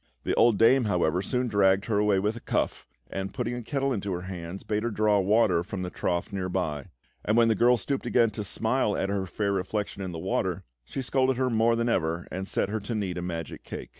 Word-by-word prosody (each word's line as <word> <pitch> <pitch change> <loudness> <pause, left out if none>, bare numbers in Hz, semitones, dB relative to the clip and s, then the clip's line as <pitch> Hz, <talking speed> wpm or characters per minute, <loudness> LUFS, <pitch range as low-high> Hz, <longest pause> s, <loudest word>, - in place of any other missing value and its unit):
The - - 0
old 115 -3 +4
dame, 120 +3 +5
however, 90 -3 +1
soon 125 +5 -1
dragged 95 -3 +3
her 105 -3 +1
away 105 -2 +3
with 105 +3 0
a - - -6
cuff, - - -2 0.2
and, 95 0 -4
putting 120 -2 -2
a 120 - -4
kettle 135 +3 -1
into 100 -3 -3
her 90 - -3
hands, 90 0 -7
bade 105 0 -1
her 120 - -1
draw 105 -1 +2
water 100 -3 +3
from 95 0 -5
the 90 - -4
trough 85 +1 -2
near 95 -1 -2
by; 80 -6 -2 0.4
and 105 +2 +1
when 115 -1 +5
the - - +4
girl 120 +4 +4
stooped 135 +5 -3
again 115 -3 +3
to 105 0 -4
smile 110 +2 0
at 95 - -1
her 100 -1 -1
fair 100 +3 -1
reflection 100 +1 -2
in 95 -2 -4
the 85 - -6
water, 80 - -1 0.2
she 135 - -5
scolded 130 0 +1
her 130 -1 +1
more 115 +1 +3
than 115 +1 0
ever, 85 -6 0
and 95 +1 -4
set 100 - 0
her 110 +1 -1
to 105 +3 -4
knead 95 -4 -2
a - - -4
magic 85 -3 -5
cake. - - -7
105 Hz, 240 wpm, -27 LUFS, 95-115 Hz, 0.4 s, dame